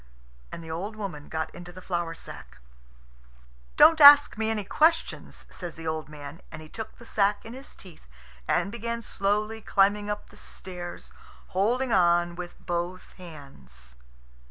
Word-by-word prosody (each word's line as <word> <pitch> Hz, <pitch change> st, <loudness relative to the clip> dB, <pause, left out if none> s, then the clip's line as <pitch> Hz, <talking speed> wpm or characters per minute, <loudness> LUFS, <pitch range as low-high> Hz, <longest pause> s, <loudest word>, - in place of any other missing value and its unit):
And 165 Hz, -, -8 dB
the 160 Hz, -, -8 dB
old 195 Hz, +7 st, -4 dB
woman 185 Hz, -9 st, -7 dB
got 160 Hz, 0 st, -3 dB
into 175 Hz, 0 st, -10 dB
the 185 Hz, -, -11 dB
flour 175 Hz, -2 st, -3 dB
sack. -, -, -11 dB, 1.2 s
"Don't 320 Hz, -1 st, +7 dB
ask 290 Hz, 0 st, +10 dB
me 220 Hz, 0 st, -1 dB
any 220 Hz, -2 st, -1 dB
questions," 320 Hz, -, 0 dB
says 175 Hz, -3 st, -7 dB
the 165 Hz, -, -10 dB
old 160 Hz, -1 st, -3 dB
man; 150 Hz, 0 st, -10 dB
and 155 Hz, -, -8 dB
he 155 Hz, 0 st, -12 dB
took 220 Hz, +5 st, -8 dB
the 235 Hz, -, -14 dB
sack 205 Hz, -2 st, +1 dB
in 225 Hz, -, -8 dB
his 265 Hz, +2 st, -11 dB
teeth 175 Hz, -, -16 dB, 0.4 s
and 200 Hz, -, +1 dB
began 235 Hz, +1 st, -4 dB
slowly 210 Hz, +2 st, -1 dB
climbing 205 Hz, +1 st, +2 dB
up 210 Hz, 0 st, -5 dB
the 205 Hz, -, -17 dB
stairs, 180 Hz, -4 st, -8 dB, 0.4 s
holding 235 Hz, +6 st, +1 dB
on 175 Hz, -2 st, +3 dB
with 175 Hz, 0 st, -8 dB
both 175 Hz, +1 st, -4 dB
hands. 70 Hz, -, -13 dB
185 Hz, 155 wpm, -27 LUFS, 165-215 Hz, 1.2 s, ask